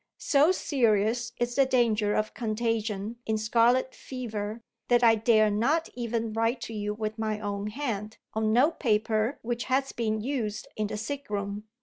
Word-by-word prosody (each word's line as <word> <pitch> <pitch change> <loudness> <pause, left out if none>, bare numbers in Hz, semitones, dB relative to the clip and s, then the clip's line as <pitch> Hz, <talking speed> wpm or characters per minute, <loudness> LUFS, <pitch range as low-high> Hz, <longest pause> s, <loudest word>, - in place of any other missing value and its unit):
So 295 +3 +4
serious 235 - +1
is 240 0 0
the 275 +1 +3
danger 225 -5 +2
of 215 0 -1
contagion 225 -1 -2
in 220 0 +1
scarlet 235 +4 +2
fever, 225 -3 -5 0.2
that 245 0 +4
I 230 -1 +7
dare 215 -1 +4
not 275 +11 +1
even 230 -2 -2
write 225 +3 +1
to 230 - -6
you 210 -1 -3
with 215 0 -4
my 215 -1 -1
own 205 -1 -3
hand 215 -3 -4 0.2
on 220 0 +1
note 265 +9 +3
paper 220 +1 +1
which 235 0 -2
has 270 +1 +1
been 220 -2 -1
used 220 -3 -3
in 215 -1 -1
the 210 - -4
sick 280 +5 -5
room. 200 0 -3
225 Hz, 170 wpm, -28 LUFS, 215-245 Hz, 0.2 s, I